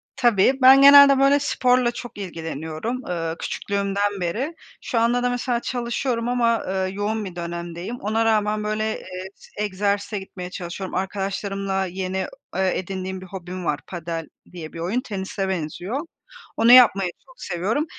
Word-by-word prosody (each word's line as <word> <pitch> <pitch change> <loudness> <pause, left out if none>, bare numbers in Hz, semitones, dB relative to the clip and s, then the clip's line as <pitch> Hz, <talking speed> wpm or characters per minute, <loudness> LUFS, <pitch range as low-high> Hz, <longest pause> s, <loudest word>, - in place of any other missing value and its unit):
Tabii 240 -2 +4
ben 265 +1 +8
genelde 280 -1 +9
böyle 275 +1 +5
sporla 250 -3 +2
çok 240 -2 -9
ilgileniyorum. 165 - -5
Iıı, 165 -2 -2
küçüklüğümden 200 0 -2
beri. 240 - -2 0.3
Şu 235 - -1
anda 240 +2 +2
da 245 - +2
mesela 245 0 -1
çalışıyorum 240 -1 -2
ama, 235 -2 +2
ııı, 190 0 -2
yoğun 210 +2 -2
bir 185 -2 -8
dönemdeyim, 170 +4 -5
ona 220 +2 0
rağmen 215 -1 +1
böyle, 215 +1 -1 0.2
eee, 185 0 -8
s 210 - -7
egzersize 205 +1 -1
gitmeye 185 -2 -8
çalışıyorum. 185 +1 -6
Arkadaşlarımla 195 0 -2
yeni, 185 +1 -4 0.4
eee, 190 0 +2
edindiğim 190 0 -5
bir - - -9
hobim 185 -1 -7
var 150 -2 0
padel 165 -2 -5 0.2
diye 165 -3 -8
bir 165 - -8
oyun, 190 +9 -1
tenise 195 -4 -4
benziyor, 180 - -3 0.6
onu 230 +1 +5
yapmayı 200 -8 +7
çok 260 -1 -19
seviyorum. 195 - -1
200 Hz, 150 wpm, -23 LUFS, 185-235 Hz, 0.6 s, genelde